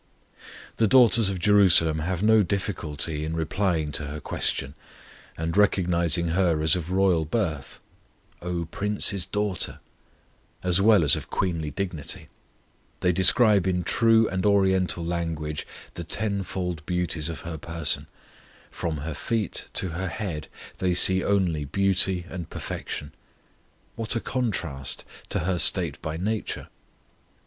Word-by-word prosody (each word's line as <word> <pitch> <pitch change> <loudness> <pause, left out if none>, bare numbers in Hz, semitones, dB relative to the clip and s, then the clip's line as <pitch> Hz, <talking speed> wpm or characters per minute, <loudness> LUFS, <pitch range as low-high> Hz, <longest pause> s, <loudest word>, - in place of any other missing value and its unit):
The 110 - +3
daughters 115 -3 +6
of 95 - -3
Jerusalem 90 -5 +5
have 90 +4 -2
no 110 0 +5
difficulty 85 -6 -2
in 80 +1 -3
replying 80 -1 -1
to 75 0 -2
her 75 +2 -6
question, 70 -1 -2 0.6
and 80 +1 -3
recognizing 85 -4 +2
her 85 -2 +1
as 80 - +4
of 90 -2 -5
royal 95 -3 +2
birth 80 - -3 0.6
"O 85 -1 -3
Prince's 100 +1 -1
daughter" 105 -2 -2 0.8
as 90 +1 +3
well 105 -3 +5
as 75 - +4
of - - -7
queenly 85 -5 -2
dignity, 90 -5 -5 0.7
they 90 - +3
describe 100 +1 +5
in 90 -1 0
true 115 +3 +3
and 95 0 -3
Oriental 95 -4 +2
language 80 -3 -3 0.3
the 85 - -6
tenfold 95 -3 -2
beauties 90 -3 -1
of 80 - -6
her 80 -2 -7
person; 85 0 -1 0.6
from 80 -2 -3
her 80 - -4
feet 110 +5 -3
to 95 - 0
her 90 +3 -4
head 85 -5 -5 0.3
they 90 -1 0
see 95 +1 +5
only 90 -7 0
beauty 95 +2 +2
and 90 -2 -7
perfection. 75 0 -6 0.8
What 115 +1 0
a - - +1
contrast 95 - -3 0.2
to - - 0
her 90 +1 -1
state 85 -7 +2
by 80 -1 -4
nature! 105 +5 -3
90 Hz, 135 wpm, -25 LUFS, 80-100 Hz, 0.8 s, daughters